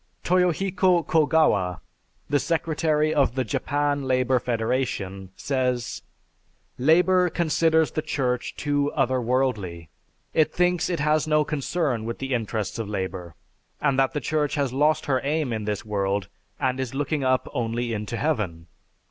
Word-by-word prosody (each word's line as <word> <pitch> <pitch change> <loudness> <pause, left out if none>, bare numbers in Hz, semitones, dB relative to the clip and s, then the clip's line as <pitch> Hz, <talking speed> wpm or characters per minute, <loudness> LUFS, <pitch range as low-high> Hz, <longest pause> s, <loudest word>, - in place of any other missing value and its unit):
Toyohiko 180 0 +2
Kogawa, 150 - +2 0.5
the 145 0 +2
secretary 155 -1 0
of 140 -4 +2
the 130 - +1
Japan 145 +5 -1
Labor 130 0 +2
Federation, 110 -5 -2
says: 125 -3 -1 0.8
"Labor 180 +6 +4
considers 160 -1 +2
the 155 - -2
Church 125 -4 -2
too 145 0 0
other 130 -2 +1
worldly. 110 - -1 0.4
It 155 - +3
thinks 180 0 +1
it 170 -4 -1
has 155 +1 +2
no 150 0 +3
concern 145 -4 -1
with 115 0 -4
the 135 0 -3
interests 110 -3 -2
of 110 -3 -4
labor; 95 -4 -4 0.4
and 140 -2 +1
that 135 +2 +2
the 150 - -2
Church 150 +2 0
has 140 -4 -1
lost 150 +3 +2
her 130 -2 +1
aim 145 -3 0
in 110 -2 -3
this 105 +2 -3
world 100 -1 -1 0.3
and 130 0 0
is 130 -1 -3
looking 145 +1 -1
up 130 -1 +1
only 120 0 -2
into 105 +2 -4
heaven. 105 - -1
135 Hz, 145 wpm, -25 LUFS, 115-155 Hz, 0.8 s, Labor